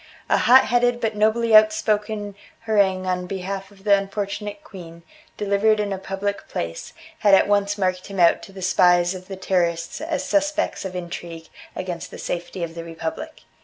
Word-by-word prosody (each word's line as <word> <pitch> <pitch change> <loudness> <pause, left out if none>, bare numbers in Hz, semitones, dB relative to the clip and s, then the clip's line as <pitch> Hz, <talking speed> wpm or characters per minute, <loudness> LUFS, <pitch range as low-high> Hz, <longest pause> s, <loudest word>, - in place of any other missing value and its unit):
A - - +4
hot 260 +2 +6
headed 245 0 +2
but 225 -2 -1
nobly 220 +2 +3
outspoken 215 -1 +2 0.3
harangue 200 -4 +1
on 180 -1 -2
behalf 195 +1 -5
of 195 -1 -20
the 200 -1 +5
unfortunate 205 +5 -4
queen, 170 - -12 0.3
delivered 210 +1 +2
in 205 -1 -1
a 190 - -5
public 195 +1 -4
place, 85 0 -5 0.3
had 205 -2 +6
at - - +3
once 205 0 +1
marked 185 -2 -1
him 195 -1 -6
out 170 -1 +5
to - - -12
the 190 -1 -9
spies 180 -1 +4
of 185 0 -10
the 195 - -6
Terrorists 170 -3 -1
as 320 +1 -2
suspect 300 -5 0
of 185 -1 -6
intrigue 170 -2 -7 0.3
against 180 -2 -5
the - - -10
safety 175 +1 -4
of 165 -1 -5
the 165 0 -7
Republic. 165 - -6
195 Hz, 175 wpm, -22 LUFS, 180-215 Hz, 0.3 s, hot